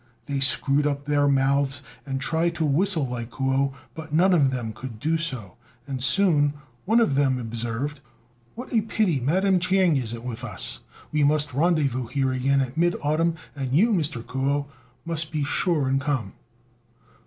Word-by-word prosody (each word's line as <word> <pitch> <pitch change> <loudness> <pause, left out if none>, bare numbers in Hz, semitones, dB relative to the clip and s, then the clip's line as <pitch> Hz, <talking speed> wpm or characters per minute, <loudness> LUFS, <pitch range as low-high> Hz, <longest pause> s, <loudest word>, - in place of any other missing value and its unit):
They 140 -1 -2
screwed 140 +2 +2
up 140 -1 -3
their 145 -1 +2
mouths 140 0 +1 0.2
and 135 -1 -2
tried 165 +4 0
to 160 -1 0
whistle 160 0 +3
like 120 -2 -5
Kuo, 135 +2 0 0.2
but 160 -1 -9
none 180 +5 +4
of 145 -6 +4
them 120 -4 -4
could 115 0 -8
do 160 +5 0
so; 125 - -3 0.3
and 135 -2 -5
soon 145 -1 +3 0.3
one 225 +4 +4
of 225 -11 +2
them 135 -2 +2
observed, 120 +4 -4 0.6
"What 250 +2 -8
a 225 - +4
pity 205 -8 0
Madam 185 +8 +2
Ch'ing 180 -3 +3
isn't 120 -2 -4
with 120 -2 -5
us: - - -1 0.3
we 150 -1 +1
must 150 -1 +2
rendezvous 140 -5 +1
here 135 +1 0
again 135 +2 +1
at 130 +1 -4
mid 175 +1 +2
autumn, 160 +3 +1 0.2
and 135 -2 -3
you, 210 +11 +4
Mr. 150 - -1
Kuo, 140 +2 -1 0.4
must 165 -2 -2
be 155 -2 -1
sure 150 0 +1
and 135 +1 +1
come." 135 -9 -2
145 Hz, 170 wpm, -24 LUFS, 130-165 Hz, 0.6 s, none